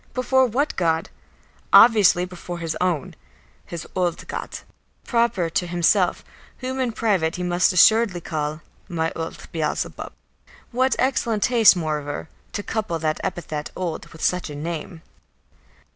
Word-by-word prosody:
Before 260 Hz, +1 st, +3 dB
what 275 Hz, +6 st, -1 dB
God? 165 Hz, -2 st, 0 dB, 0.6 s
Obviously 210 Hz, -6 st, +7 dB
before 180 Hz, -1 st, -8 dB
his 165 Hz, -2 st, -3 dB
own, 175 Hz, -6 st, -1 dB, 0.5 s
"his 170 Hz, -2 st, -6 dB
old 175 Hz, -2 st, -1 dB
God," -, -, -6 dB, 0.4 s
proper 230 Hz, -7 st, +1 dB
to 180 Hz, -, 0 dB
himself, 175 Hz, +2 st, +2 dB, 0.3 s
whom 260 Hz, +1 st, -4 dB
in 250 Hz, -2 st, 0 dB
private 195 Hz, -8 st, 0 dB
he 180 Hz, -, -4 dB
must 175 Hz, 0 st, +2 dB
assuredly 200 Hz, +1 st, +5 dB
call, 155 Hz, -1 st, -4 dB, 0.3 s
"my 165 Hz, -2 st, -1 dB
old 165 Hz, 0 st, -6 dB
Beelzebub." 155 Hz, -2 st, -3 dB, 0.6 s
What 255 Hz, +2 st, +2 dB
excellent 235 Hz, -5 st, 0 dB
taste, 230 Hz, -5 st, +6 dB
moreover, 155 Hz, -3 st, -3 dB, 0.2 s
to 205 Hz, -, -3 dB
couple 210 Hz, -7 st, -2 dB
that 155 Hz, -1 st, -1 dB
epithet 155 Hz, -3 st, -4 dB
"old" 175 Hz, -4 st, -4 dB
with 160 Hz, -, -11 dB
such 180 Hz, -3 st, 0 dB
a 145 Hz, -, -7 dB
name! 165 Hz, +2 st, -6 dB
180 Hz, 135 wpm, -23 LUFS, 160-220 Hz, 0.6 s, Obviously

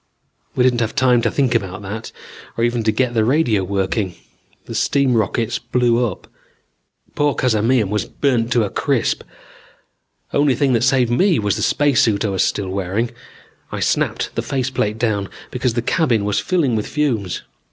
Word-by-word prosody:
"We 125 Hz, -, +3 dB
didn't 125 Hz, -2 st, +3 dB
have 115 Hz, -2 st, -1 dB
time 125 Hz, -3 st, +3 dB
to -, -, +1 dB
think 135 Hz, -4 st, +1 dB
about 100 Hz, -3 st, -2 dB
that, 105 Hz, +3 st, -6 dB, 0.5 s
or 115 Hz, -, 0 dB
even 120 Hz, 0 st, +1 dB
to 110 Hz, -, +4 dB
get 120 Hz, +2 st, 0 dB
the 110 Hz, -2 st, +2 dB
radio 120 Hz, -5 st, +2 dB
working. 95 Hz, 0 st, -1 dB, 0.5 s
The -, -, -7 dB
steam 140 Hz, -2 st, +2 dB
rockets 115 Hz, +1 st, 0 dB
blew 120 Hz, -1 st, +1 dB
up. 105 Hz, -7 st, -4 dB, 0.9 s
Poor 145 Hz, -1 st, +1 dB
Cazamian 115 Hz, -2 st, +2 dB
was 105 Hz, -3 st, 0 dB
burnt 120 Hz, -4 st, 0 dB
to 120 Hz, -, +3 dB
a 100 Hz, -, -3 dB
crisp. -, -, 0 dB, 1.1 s
Only 145 Hz, -2 st, +3 dB
thing 135 Hz, +1 st, +2 dB
that 115 Hz, -, +2 dB
saved 130 Hz, -2 st, +3 dB
me 180 Hz, +8 st, +3 dB
was 105 Hz, -2 st, 0 dB
the -, -, -3 dB
spacesuit 120 Hz, -8 st, +2 dB
I -, -, 0 dB
was 95 Hz, -1 st, +1 dB
still 100 Hz, -2 st, -1 dB
wearing. 100 Hz, +5 st, -2 dB, 0.6 s
I -, -, -4 dB
snapped -, -, 0 dB
the -, -, -1 dB
face 130 Hz, -1 st, -2 dB
plate 105 Hz, -4 st, -1 dB
down 105 Hz, -4 st, -1 dB, 0.2 s
because 125 Hz, -2 st, -1 dB
the 120 Hz, -, -1 dB
cabin 120 Hz, -7 st, +1 dB
was 105 Hz, -1 st, +1 dB
filling 160 Hz, -10 st, +1 dB
with 105 Hz, -, -2 dB
fumes. 120 Hz, -, -1 dB
115 Hz, 175 wpm, -19 LUFS, 105-130 Hz, 1.1 s, to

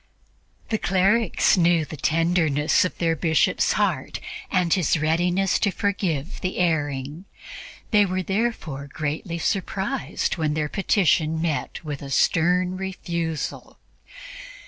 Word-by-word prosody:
The 220 Hz, -, 0 dB
clerics 195 Hz, +4 st, +2 dB
knew 170 Hz, -2 st, +3 dB
the 155 Hz, -, -8 dB
tenderness 160 Hz, -1 st, +2 dB
of 185 Hz, -, -3 dB
their 165 Hz, -1 st, +1 dB
Bishop's 160 Hz, 0 st, +2 dB
heart -, -, -1 dB, 0.3 s
and 180 Hz, -3 st, +2 dB
his 180 Hz, -3 st, +2 dB
readiness 175 Hz, +5 st, +1 dB
to 205 Hz, -, +2 dB
forgive 190 Hz, -7 st, -2 dB
the 185 Hz, -, -3 dB
erring; 150 Hz, -1 st, -1 dB, 0.7 s
they 210 Hz, -2 st, +5 dB
were 185 Hz, 0 st, -2 dB
therefore 190 Hz, -, -2 dB
greatly 155 Hz, +4 st, -3 dB
surprised 195 Hz, -, -2 dB
when 155 Hz, -2 st, 0 dB
their 150 Hz, -1 st, -1 dB
petition 160 Hz, -5 st, +1 dB
met 160 Hz, 0 st, -2 dB
with 145 Hz, -3 st, -5 dB
a 140 Hz, -, -7 dB
stern 180 Hz, +6 st, +2 dB
refusal. 170 Hz, -4 st, -4 dB
170 Hz, 120 wpm, -24 LUFS, 155-190 Hz, 0.7 s, they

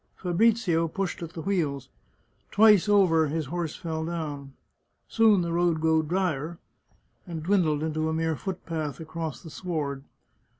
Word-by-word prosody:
Fabrizio 180 Hz, -2 st, +2 dB
pushed 190 Hz, +3 st, -3 dB
at 165 Hz, -1 st, -7 dB
the 160 Hz, -, -6 dB
wheels. 155 Hz, -9 st, -1 dB, 0.6 s
Twice 210 Hz, -2 st, +5 dB
over 175 Hz, -6 st, +4 dB
his 155 Hz, +1 st, -2 dB
horse 165 Hz, +1 st, -3 dB
fell 160 Hz, -2 st, -4 dB
down. 150 Hz, -5 st, -5 dB, 0.5 s
Soon 220 Hz, -4 st, +4 dB
the 170 Hz, -1 st, -2 dB
road 170 Hz, -2 st, +2 dB
grew 160 Hz, 0 st, +3 dB
dryer, 165 Hz, -1 st, -2 dB, 0.7 s
and 165 Hz, -3 st, -5 dB
dwindled 160 Hz, -5 st, +2 dB
into 155 Hz, 0 st, -1 dB
a -, -, -1 dB
mere 160 Hz, 0 st, 0 dB
foot 190 Hz, +3 st, -6 dB
path 155 Hz, -5 st, -4 dB
across 160 Hz, -1 st, -5 dB
the 160 Hz, -, -10 dB
sward. 145 Hz, -7 st, -3 dB
165 Hz, 145 wpm, -27 LUFS, 155-180 Hz, 0.7 s, Twice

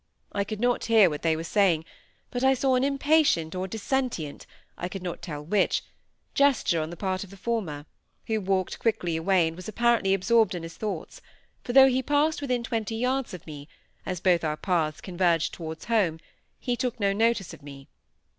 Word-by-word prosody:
I 200 Hz, -, 0 dB
could 210 Hz, +1 st, -6 dB
not 245 Hz, +1 st, +1 dB
hear 220 Hz, -6 st, +5 dB
what 150 Hz, -, -5 dB
they 160 Hz, -1 st, +2 dB
were 160 Hz, -, -4 dB
saying, 170 Hz, -3 st, +2 dB, 0.5 s
but 245 Hz, +1 st, -3 dB
I 265 Hz, 0 st, +5 dB
saw 265 Hz, +1 st, +1 dB
an 255 Hz, 0 st, +2 dB
impatient 280 Hz, -, +2 dB
or 185 Hz, +1 st, -3 dB
dissentient 220 Hz, -, -3 dB, 0.3 s
(I 175 Hz, -, -4 dB
could 190 Hz, 0 st, -7 dB
not 175 Hz, -2 st, -5 dB
tell 150 Hz, -3 st, -6 dB
which) 195 Hz, +4 st, +1 dB, 0.5 s
gesture 275 Hz, -, +3 dB
on 155 Hz, -, -4 dB
the 175 Hz, -, -8 dB
part 185 Hz, 0 st, -2 dB
of 200 Hz, -, -12 dB
the 195 Hz, -, -13 dB
former, 185 Hz, -10 st, -3 dB, 0.4 s
who 220 Hz, -1 st, -1 dB
walked 190 Hz, -1 st, -1 dB
quickly 210 Hz, -7 st, 0 dB
away, 175 Hz, +1 st, +3 dB
and 160 Hz, -, -5 dB
was 185 Hz, +3 st, -9 dB
apparently 230 Hz, -3 st, +2 dB
absorbed 220 Hz, +1 st, +3 dB
in 170 Hz, -, -5 dB
his 165 Hz, 0 st, -8 dB
thoughts, 200 Hz, -7 st, -5 dB, 0.4 s
for 245 Hz, -, -4 dB
though 270 Hz, 0 st, +9 dB
he 260 Hz, 0 st, +2 dB
passed 295 Hz, +3 st, +1 dB
within 250 Hz, -4 st, -1 dB
twenty 225 Hz, -1 st, -2 dB
yards 250 Hz, -2 st, -1 dB
of 175 Hz, -, -12 dB
me, 145 Hz, -2 st, -9 dB, 0.4 s
as 180 Hz, -2 st, -4 dB
both 175 Hz, -2 st, +3 dB
our 155 Hz, -1 st, -1 dB
paths 155 Hz, -3 st, -1 dB
converged 175 Hz, -3 st, +1 dB
towards 160 Hz, -2 st, -7 dB
home, 195 Hz, -9 st, +1 dB, 0.4 s
he 245 Hz, -2 st, -1 dB
took 250 Hz, -1 st, -3 dB
no 200 Hz, -1 st, +2 dB
notice 225 Hz, -3 st, +1 dB
of -, -, -12 dB
me. 140 Hz, -1 st, -11 dB
195 Hz, 195 wpm, -26 LUFS, 165-235 Hz, 0.5 s, though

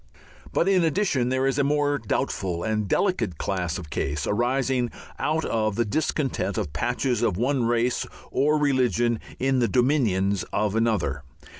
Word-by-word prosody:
But 170 Hz, -, +1 dB
in 190 Hz, -3 st, +4 dB
addition 150 Hz, -7 st, +1 dB
there 130 Hz, +1 st, +1 dB
is 135 Hz, +1 st, +1 dB
a -, -, +4 dB
more 145 Hz, 0 st, +1 dB
doubtful 95 Hz, -5 st, -2 dB
and 110 Hz, -2 st, -1 dB
delicate 180 Hz, -, 0 dB
class 90 Hz, -3 st, -2 dB
of 80 Hz, -5 st, -9 dB
case, 70 Hz, +1 st, -2 dB
arising 125 Hz, +2 st, +1 dB, 0.3 s
out 155 Hz, +1 st, 0 dB
of 110 Hz, -2 st, 0 dB
the 120 Hz, -, +1 dB
discontent 150 Hz, +2 st, -1 dB
of 70 Hz, -, -3 dB
patches 125 Hz, -4 st, 0 dB
of 105 Hz, -7 st, +1 dB
one 125 Hz, +2 st, +1 dB
race 120 Hz, +1 st, +1 dB, 0.2 s
or 150 Hz, +2 st, +2 dB
religion 125 Hz, -5 st, +2 dB, 0.2 s
in 135 Hz, 0 st, +1 dB
the 120 Hz, -, +3 dB
dominions 110 Hz, -, +2 dB
of 105 Hz, -1 st, 0 dB
another. 105 Hz, -, 0 dB
120 Hz, 155 wpm, -25 LUFS, 105-140 Hz, 0.3 s, in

